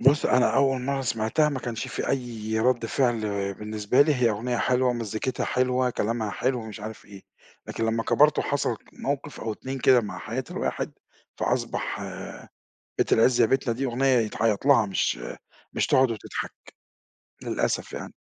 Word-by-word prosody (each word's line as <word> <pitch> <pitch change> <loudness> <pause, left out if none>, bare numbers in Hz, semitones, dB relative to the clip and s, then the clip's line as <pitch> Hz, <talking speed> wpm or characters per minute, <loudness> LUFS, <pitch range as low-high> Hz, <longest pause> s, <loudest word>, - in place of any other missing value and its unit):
بُصّ، 140 +4 +4
أنا 125 0 +3
أول 135 -2 +3
مرّة 140 +1 -1
سمعتها 115 +4 +1
ما 140 -3 -2
كانش 120 -2 -4
في - - -3
أي 115 -4 -2
رَدّ 120 -1 +2
فعل 120 -2 +1 0.3
بالنسبة 105 +4 0
لي 150 -1 +2
هي 120 -3 +3
أغنية 120 +4 -2
حلوة، 125 +3 +2
ومزّيكتها 115 +1 -2
حلوة، 125 0 +1
كلامها 110 -2 -1
حلو، 130 +2 0
ومش 110 -1 -8
عارف 110 +1 -8
إيه، 100 -1 -13 0.4
لكن 115 - -3
لمّا 115 0 0
كبَرت 150 +6 +4
وحصلت 140 -5 0
موقف 140 +1 -4
أو 110 -1 -2
2 130 +5 -6
كده 130 -1 +5
مع 100 -5 -6
حياة 120 +6 -4
الواحد، - - -2 0.5
فأصبح - - -1 1.0
بيت - - +1
العز 120 +2 +4
يا - - +6
بيتنا 125 -1 +1
دي 135 +3 -3
أغنية 130 +2 0
يتعيّط 110 +1 0
لها، 125 -7 +6
مش 95 -9 0 0.5
مش - - 0
تقعُد 130 -2 +4
وتضحك، 110 - -5 0.9
للأسف - - -1
يعني. - - -6
120 Hz, 160 wpm, -26 LUFS, 110-130 Hz, 1.0 s, يا